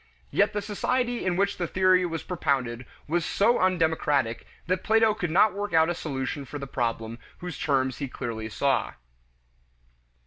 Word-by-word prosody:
Yet - - +2
the 205 -1 -2
society 245 +4 -1
in 180 -2 0
which 200 +2 +1
the 175 - -1
theory 185 0 +3
was 165 -1 -4
propounded 130 -8 -1 0.2
was 170 +3 0
so 220 +7 +2
undemocratic 160 -9 +1 0.2
that 185 +1 -1
Plato 225 0 +4
could 200 -5 -3
not 195 +5 +4
work 205 -1 -4
out 160 +1 +5
a - - 0
solution 140 -3 -4
for 140 +2 -7
the 140 - -5
problem 115 -3 -3 0.2
whose 180 -3 -7
terms 130 -3 0
he 140 - -2
clearly 110 -3 -5
saw. 135 +2 0
165 Hz, 165 wpm, -26 LUFS, 130-190 Hz, 0.2 s, out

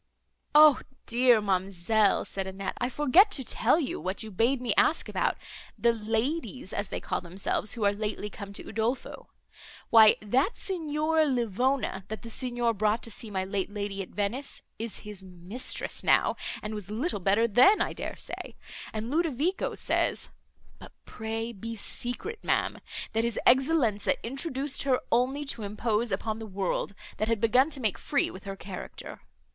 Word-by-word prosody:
"O 300 -2 +8 0.3
dear, 240 -1 +4
ma'amselle!" 195 +1 +2
said 195 -1 -4
Annette, 195 0 -4
"I 245 - +1
forget 295 - +5
to 270 - +1
tell 250 +5 +3
you 280 - -2
what 190 +4 -2
you 220 - -8
bade 235 +7 +2
me 245 -1 0
ask - - +3
about, - - 0 0.4
the 235 0 +3
ladies, 225 - -2
as 205 0 -2
they - - -3
call - - -3
themselves, 190 +4 -2
who 220 -3 -1
are 200 - +4
lately 210 0 -3
come 200 -1 -8
to - - -6
Udolpho. 230 +4 -3 0.6
Why 220 -2 +8
that 255 - +1
Signora 315 -3 +1
Livona, 245 -4 0
that 220 +2 -6
the 230 - -8
Signor 240 -1 0
brought 215 +2 +1
to 230 - -4
see 220 +1 -6
my 190 -2 -1
late 195 0 -2
lady 200 -1 -4
at 185 - -7
Venice, 230 +7 -3 0.2
is 225 -1 -3
his 205 -2 -7
mistress 185 +6 -2
now, - - +4 0.3
and 210 +1 -4
was 205 -3 -6
little 230 - -2
better 200 +5 +3
then, 250 - +6
I - - 0
dare - - -5
say. - - -7 0.4
And 220 +3 -4
Ludovico 330 +2 0
says - - 0 0.5
(but - - -12
pray 225 +1 -4
be 230 +2 -6
secret, 245 - -4
ma'am) - - 0 0.3
that 225 +1 +2
his 235 -1 -1
Excellenza 255 -5 +4
introduced 270 +2 -2
her 265 -2 +2
only 260 +5 +1
to 270 -5 -3
impose 215 +2 -1
upon 215 +3 -2
the 220 - -6
world, 195 0 -2 0.2
that 215 - 0
had 230 -1 +1
begun 250 +6 +4
to 295 - -4
make 215 -6 -1
free - - 0
with 185 - -11
her 195 0 -5
character. 190 -2 -8
225 Hz, 170 wpm, -28 LUFS, 205-260 Hz, 0.6 s, O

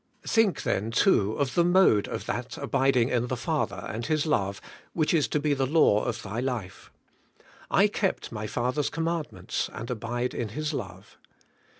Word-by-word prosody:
Think 225 -4 +2
then 105 +3 0
too 115 - +3
of 140 0 -1
the 175 - +4
mode 175 - +4
of - - -5
that - - -4
abiding 130 -2 +2
in 120 -1 0
the 130 - -2
Father 150 +6 -2
and 115 +2 -4
His 155 +3 0
love 100 -10 0 0.3
which 155 -1 +1
is 155 -4 +3
to 150 - 0
be 145 0 +1
the 135 -1 0
law 135 -8 +4
of 120 -2 -3
thy 105 +3 -4
life. 120 -8 -4 0.8
*I - - +5
kept - - -2
my 105 0 -4
Father's 125 +6 -1
commandments 165 -1 -3
and 115 +3 -6
abide 120 +2 -2
in 115 - -3
His 155 +7 -3
love.' 95 -6 -7
125 Hz, 175 wpm, -27 LUFS, 110-155 Hz, 0.8 s, I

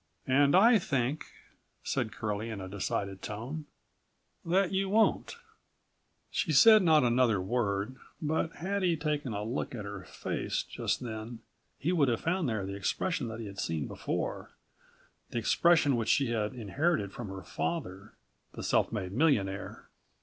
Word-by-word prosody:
"And 140 +3 +4
I 225 +4 +7
think," 135 -2 -1 0.6
said 110 - -1
Curlie 105 +1 -3
in 110 -3 -5
a 95 - -6
decided 100 0 -3
tone, 130 +9 -6 0.8
"that 185 +2 +2
you 195 0 0
won't." 220 - +2 0.9
She 165 - 0
said 215 +9 +8
not 160 -5 +5
another 120 -3 +3
word 100 +3 -1 0.2
but 160 0 -1
had 195 +5 -2
he 175 -3 +2
taken 150 -4 -2
a 105 0 -3
look 120 +3 -3
at 105 -4 -6
her 100 -2 -7
face - - -3
just - - -2
then 115 -1 -6 0.4
he 165 - -1
would 155 -6 +3
have 115 -2 0
found 165 -3 0
there 110 -4 -2
the 100 - -5
expression 110 - -1
that 115 0 -6
he - - -6
had 100 -1 -8
seen 80 -4 -2
there - - -4
before, - - -3 0.8
the - - -5
expression 145 +4 +4
which 115 -2 -1
she 135 -4 +3
had 110 +1 -1
inherited 120 - -1
from 120 - -6
her 95 -1 -7
father, 100 - -4 0.4
the - - -7
self - - +2
made 100 -5 -3
millionaire. 105 -7 0
120 Hz, 160 wpm, -30 LUFS, 105-160 Hz, 0.9 s, said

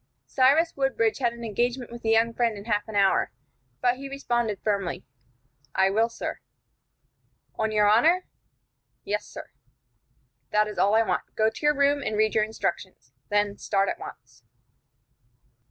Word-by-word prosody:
Cyrus 285 +6 +3
Woodbridge 270 -5 0
had 240 -3 +1
an 235 0 -10
engagement 240 +3 -2
with 235 0 -9
a - - +1
young 225 +1 +3
friend 230 -2 0
in 200 - -10
half 210 -2 -1
an 220 - -8
hour, 195 -1 +3 0.5
but 245 0 +2
he 275 +1 -7
responded, 240 -7 -1
firmly: 200 -4 -2 0.7
"I 190 0 +3
will, 225 +3 +2
sir." 230 - -5 1.1
"On 220 0 -1
your 210 -1 +3
honor?" 320 - +4 0.8
"Yes, - - -3
sir." - - -10 1.0
"That 210 0 +2
is 210 - -6
all 205 +2 +3
I 225 - +5
want. - - -3
Go 220 0 +2
to - - -11
your 295 0 +4
room, 280 +1 +2
and 220 -5 -2
read 215 0 +2
your 215 - +3
instructions. 195 -9 -4 0.2
Then 205 0 0
start 195 -1 0
at - - -4
once." 125 0 -12
225 Hz, 160 wpm, -26 LUFS, 210-245 Hz, 1.1 s, I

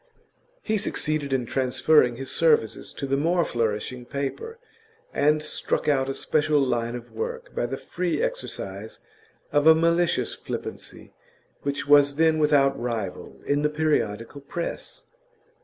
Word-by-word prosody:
He 215 -1 0
succeeded 155 -7 -2
in 130 -2 0
transferring 130 +1 +3
his 135 +2 -5
services 150 -9 +2
to - - -5
the 135 0 0
more 170 +3 +2
flourishing 115 +2 -2
paper, 140 - -4 0.6
and 150 +1 +2
struck 155 - -2
out 135 -2 +2
a 135 - -2
special 150 -1 +1
line 120 -3 0
of 120 -1 -9
work 485 +1 -5
by - - -1
the - - -4
free 180 -1 -2
exercise - - -4 0.5
of 145 +1 +3
a 160 - +9
malicious 170 +1 +2
flippancy - - -7 0.5
which 140 0 -3
was 145 -1 +6
then 160 0 +3
without 140 -2 +3
rival 115 -6 -4
in 145 +1 +1
the 150 - +2
periodical 145 -5 -1
press. 170 +5 -6
145 Hz, 140 wpm, -25 LUFS, 130-160 Hz, 0.6 s, a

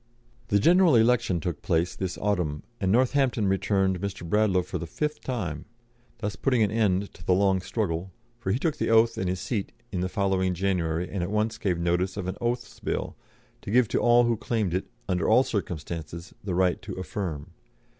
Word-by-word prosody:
The 100 - +3
general 175 - +5
election 115 -6 +3
took 80 -2 -4
place 85 +1 0
this 95 -2 -3
autumn, 90 -8 -1 0.2
and 95 -2 +1
Northampton 125 -2 +2
returned 95 -1 +1
Mr. 100 -4 -4
Bradlaugh 95 -1 +2
for 90 0 -5
the 85 - -5
fifth 150 - -3
time, 90 - -4 0.5
thus 105 -2 -3
putting 125 0 +2
an 100 - +1
end 100 -3 +1
to 85 - -14
the 90 - +3
long 95 -1 +2
struggle, 95 -3 -2 0.3
for 95 -5 -2
he 110 - +2
took 155 +2 -1
the - - -1
oath 115 0 +5
and 95 - -2
his 90 0 -2
seat 105 -2 -3 0.2
in 95 - -2
the 90 - -1
following 95 -2 0
January, 90 -2 0
and 95 - -4
at 85 - -2
once 110 +2 0
gave 95 -6 0
notice 90 +3 0
of 95 - -3
an 95 - -3
Oaths 120 -2 -2
Bill, - - -3 0.5
to - - -8
give 120 +2 +4
to - - +1
all 120 0 +5
who 120 -1 +1
claimed 110 -5 -1
it, 95 - -1 0.2
under 90 -1 0
all 130 - +6
circumstances, 85 - -5
the 95 -3 -2
right 90 -1 +2
to 95 +1 -7
affirm. 90 -5 -5
95 Hz, 195 wpm, -27 LUFS, 90-110 Hz, 0.5 s, all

